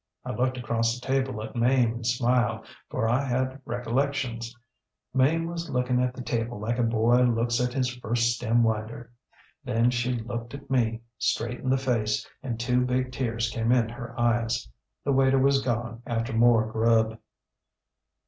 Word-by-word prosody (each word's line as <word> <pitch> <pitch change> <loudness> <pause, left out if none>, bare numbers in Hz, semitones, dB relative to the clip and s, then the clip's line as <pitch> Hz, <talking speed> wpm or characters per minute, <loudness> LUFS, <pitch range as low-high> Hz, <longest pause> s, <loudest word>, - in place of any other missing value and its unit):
I - - -3
looked 130 +1 0
across 115 0 0
the 125 - -13
table 130 -4 0
at 110 - -8
Mame 120 -1 +3
and 115 -1 -5
smiled, 120 -1 +1 0.2
for 115 - -1
I 120 +4 +2
had 130 +1 -1
recollections. 120 -1 -2 0.6
Mame 150 +6 +3
was 170 0 -5
looking 125 -1 +1
at 125 0 -1
the 125 - -6
table 115 -2 -2
like 115 +3 -2
a - - +3
boy 115 +2 +3
looks 120 0 +2
at 125 0 0
his 130 -2 +1
first 120 0 +1
stem 120 0 +2
winder. 110 +2 -2 0.5
Then 120 -1 +2
she 125 0 0
looked 115 +2 -5
at 140 -1 -11
me, 115 -3 +1 0.2
straight 120 +2 -1
in 130 - -3
the 135 - +3
face, 115 -4 0
and 120 -4 -4
two 125 +1 +2
big 125 0 0
tears 115 -3 -1
came 115 -1 0
in 120 -3 +3
her 120 +1 -8
eyes. 120 - +1 0.4
The 140 - +1
waiter 135 0 +4
was 135 +1 +3
gone 120 -1 -2
after 115 -1 -2
more 115 -1 +5
grub. 110 0 +2
120 Hz, 170 wpm, -27 LUFS, 115-130 Hz, 0.6 s, more